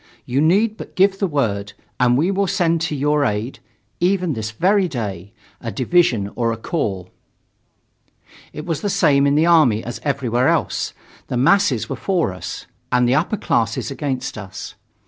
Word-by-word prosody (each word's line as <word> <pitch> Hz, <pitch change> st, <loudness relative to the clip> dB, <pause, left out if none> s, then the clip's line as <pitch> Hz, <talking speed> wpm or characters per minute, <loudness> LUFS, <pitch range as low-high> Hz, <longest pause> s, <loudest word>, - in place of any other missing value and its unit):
You 130 Hz, +3 st, 0 dB
need 205 Hz, +7 st, +3 dB
but -, -, -10 dB
give 195 Hz, +1 st, +3 dB
the 195 Hz, -, +1 dB
word, 105 Hz, -, -1 dB, 0.3 s
and 125 Hz, -1 st, +4 dB
we 170 Hz, +7 st, +2 dB
will 200 Hz, 0 st, 0 dB
send 170 Hz, -3 st, +1 dB
to 160 Hz, -2 st, -1 dB
your 145 Hz, +1 st, +1 dB
aid 105 Hz, +1 st, -2 dB, 0.4 s
even 180 Hz, -2 st, +1 dB
this 110 Hz, -2 st, -4 dB
very 185 Hz, -, +2 dB
day 100 Hz, -, -5 dB, 0.3 s
a 115 Hz, -, -4 dB
division 130 Hz, -, +1 dB
or 115 Hz, -1 st, 0 dB
a 115 Hz, -, -3 dB
corps." 100 Hz, -, -3 dB, 1.4 s
It 150 Hz, -, -7 dB
was 165 Hz, -4 st, -2 dB
the 205 Hz, -, -1 dB
same 150 Hz, -8 st, +3 dB
in 140 Hz, -, +2 dB
the 155 Hz, +2 st, +4 dB
army 155 Hz, -11 st, +4 dB
as 120 Hz, 0 st, -6 dB
everywhere 130 Hz, -3 st, 0 dB
else; -, -, 0 dB, 0.3 s
the 125 Hz, -, -2 dB
masses 195 Hz, +11 st, +3 dB
were -, -, -3 dB
for 180 Hz, -, 0 dB
us, 90 Hz, -, -7 dB, 0.3 s
and 125 Hz, 0 st, +3 dB
the 125 Hz, -, +3 dB
upper 170 Hz, +9 st, +1 dB
classes 115 Hz, -, -1 dB
against 135 Hz, -5 st, -3 dB
us. 95 Hz, 0 st, -8 dB
140 Hz, 170 wpm, -20 LUFS, 115-175 Hz, 1.4 s, and